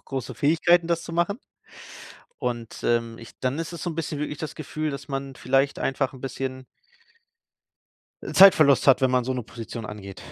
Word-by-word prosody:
auch - - -38
große 135 -3 -5
Fähigkeiten, 165 +3 +3
das 170 -1 0
zu 165 - -8
machen. 175 +6 0 1.0
Und, 120 -2 -4
ähm, 115 -1 0
ich 115 - -11
dann 130 +4 -1
ist 165 +1 -4
es 170 - -7
so - - -2
'n - - -6
bisschen 160 -2 -3
wirklich 150 0 -3
das 155 - -5
Gefühl, 155 0 -4
dass 140 +1 -7
man 135 -1 -4
vielleicht 135 +2 +1
einfach 135 0 -1
'n 130 - -12
bisschen 130 0 -5 1.6
äh, - - -6
Zeitverlust 155 -9 +7
hat, 135 - +6
wenn 130 -1 +3
man 125 -1 +2
so 130 - -1
'ne 125 - -3
Position 115 0 -8
angeht. 100 -2 -9
135 Hz, 190 wpm, -25 LUFS, 125-155 Hz, 1.6 s, Zeitverlust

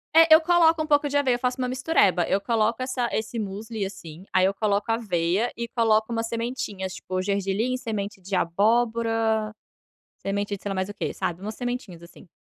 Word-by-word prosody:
É, 325 0 +8
eu 315 - +8
coloco 330 -1 +4
um 310 - -2
pouco 290 -1 +3
de 285 0 0
aveia. 260 -4 +2
Eu 240 - -5
faço 250 +1 -1
uma 250 - 0
mistureba, 250 - +2
eu 195 - +1
coloco 230 +2 0
essa 255 -2 -1
esse 220 +2 -3
musli, 215 +1 -4
assim, 180 -3 -9
aí 185 0 +4
eu 195 - +2
coloco 205 +1 0
aveia 200 -1 0
e 235 0 -4
coloco 225 -1 +2
umas 230 -1 -1
sementinhas, 230 -5 -4
tipo, 185 0 -3
gergelim, 200 +5 -1
semente 215 -5 -4
de 190 +1 -4
abóbora, 220 +3 +1 0.6
semente 200 +1 -2
de 195 - -14
sei 200 -1 -3
mais 190 0 -1
o 205 - -6
quê, - - -3
sabe, 175 +1 -3
umas 215 +2 -5
sementinhas 245 -9 -5
assim. 170 +1 -15
220 Hz, 195 wpm, -25 LUFS, 195-245 Hz, 0.6 s, É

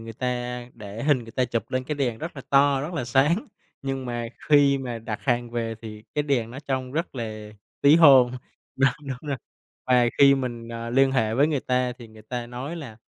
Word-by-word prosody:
người 115 0 -8
ta 125 +1 -3
để 105 0 -8
hình 145 -3 +3
người 115 -1 -10
ta 130 - +1
chụp 115 -3 -3
lên 130 0 -1
cái 150 - -3
đèn 125 -6 -1
rất 165 -1 -6
là 135 - -7
to, 140 0 +4
rất 155 +6 -5
là 145 - -2
sáng, 145 - +2 0.4
nhưng 135 -1 -3
mà 120 -1 -3 0.2
khi 140 -2 +5
mà 120 -3 -5
đặt 110 0 -5
hàng 120 -2 0
về 115 -1 -2
thì 105 -1 -9
cái 150 - +1
đèn 130 -6 0
nó 130 - -8
trông 130 -1 -2
rất 165 +1 -3
là 110 -3 -6 0.3
tí 145 +3 +7
hon. 135 -7 +7 0.5
Đúng, 135 0 +4 0.2
đúng 135 +3 -6
rồi. 140 - -1 0.5
Và 125 -1 +4
khi 140 0 +8
mình, 120 -3 -4
ờ, 115 0 -5
liên 135 +1 +4
hệ 110 -4 +1
với 140 +4 +4
người 145 -4 0
ta 125 0 0
thì 120 - -11
người 110 0 -15
ta 120 +2 -5
nói 130 +7 -6
là 130 -9 -8
125 Hz, 225 wpm, -25 LUFS, 115-140 Hz, 0.5 s, khi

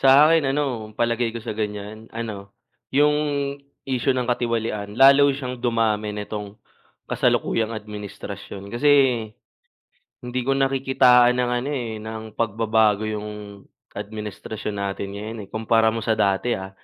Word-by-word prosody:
Sa 135 +3 +7
akin, 160 -4 +3
ano, 120 -7 -2
palagay 115 0 0
ko - - -5
sa - - -3
ganyan, 105 +1 -5
ano, 100 -4 -6 0.3
yung 150 +2 +3 0.7
isyu 130 0 0
ng 125 - 0
katiwalian, 115 -4 -2
lalo 140 +2 +7
siyang 125 -2 -5
dumami 110 -3 0
nitong, 105 0 -6 0.5
kasalukuyang 115 0 0
administrasyon. 105 -1 -8
Kasi, 125 +5 +2 1.3
hindi 125 +1 -3
ko 135 - +3
nakikitaan 130 -2 +4
ng 125 - 0
ano, 135 - -4
eh, 115 -5 -4
ng 110 +1 -6 0.2
pagbabago 110 -1 +2
yung 105 0 -4 0.7
administrasyon 105 0 -6
natin 100 0 -3
ngayon, 110 +3 -6
eh, 100 - -12
kumpara 110 0 +2
mo 115 - -3
sa 110 - +2
dati, 105 +3 +1
ha. 95 0 -6
110 Hz, 130 wpm, -23 LUFS, 105-125 Hz, 1.3 s, Sa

